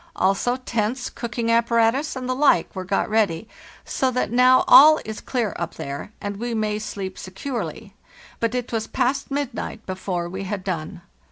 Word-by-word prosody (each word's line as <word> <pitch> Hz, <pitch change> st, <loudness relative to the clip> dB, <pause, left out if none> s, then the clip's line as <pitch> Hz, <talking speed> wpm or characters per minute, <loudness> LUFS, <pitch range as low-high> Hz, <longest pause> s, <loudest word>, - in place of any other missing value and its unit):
Also 195 Hz, +6 st, +1 dB
tents, 245 Hz, -1 st, -2 dB
cooking 230 Hz, -1 st, -2 dB
apparatus, 235 Hz, +5 st, +2 dB
and 255 Hz, -1 st, -5 dB
the 255 Hz, -, 0 dB
like, 265 Hz, -, +3 dB
were 185 Hz, -, -3 dB
got 190 Hz, +2 st, 0 dB
ready, 215 Hz, -3 st, +1 dB, 0.4 s
so 260 Hz, -, 0 dB
that 250 Hz, -4 st, -1 dB
now 255 Hz, +1 st, +5 dB
all 310 Hz, +2 st, +9 dB
is 220 Hz, 0 st, -6 dB
clear 235 Hz, -6 st, -1 dB
up 170 Hz, -1 st, -4 dB
there, 140 Hz, +8 st, -6 dB
and 205 Hz, 0 st, -5 dB
we 235 Hz, +2 st, -3 dB
may 215 Hz, -1 st, -1 dB
sleep 195 Hz, -3 st, -6 dB
securely; 235 Hz, +7 st, -5 dB, 0.5 s
but 230 Hz, +1 st, 0 dB
it 250 Hz, -1 st, -3 dB
was 225 Hz, -2 st, -2 dB
past 260 Hz, +2 st, -1 dB
midnight 275 Hz, -5 st, -4 dB
be 190 Hz, -, -3 dB
fore 180 Hz, -2 st, -3 dB
we 190 Hz, +3 st, -5 dB
had 195 Hz, -1 st, -4 dB
done. 175 Hz, -1 st, -4 dB
225 Hz, 175 wpm, -23 LUFS, 195-250 Hz, 0.5 s, all